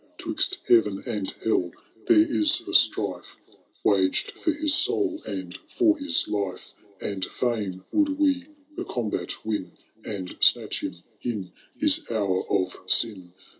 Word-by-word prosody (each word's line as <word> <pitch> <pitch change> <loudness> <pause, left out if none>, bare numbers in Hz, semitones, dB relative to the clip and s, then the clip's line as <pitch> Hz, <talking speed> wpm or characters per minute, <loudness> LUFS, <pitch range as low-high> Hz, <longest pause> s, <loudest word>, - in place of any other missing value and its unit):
*Twizt - - +1
heaven 105 -4 +3
and 100 -3 -2
hell 95 -5 +1 0.4
there 345 -3 +5
is 315 +2 +2
a - - -8
strife 100 -5 +2 0.5
Waged 95 -2 +2
for 325 - -1
his 305 0 +1
soul 330 -1 +1
and 95 -3 -5 0.2
for 325 -3 +4
his 285 +1 +1
life. 100 -3 -4 0.3
And 100 -2 -3
fisdn 105 -7 -3
would 295 -2 +1
we 280 -3 +1 0.3
the - - -4
combat 115 -3 -4
win. 105 -4 -3 0.3
And 95 -4 -5
snatch - - +4
him - - -4 0.3
in 105 -7 -4 0.3
his - - +3
hour 100 -5 0
of 95 -2 -1
sin. 95 -6 +3
105 Hz, 135 wpm, -25 LUFS, -, 0.5 s, there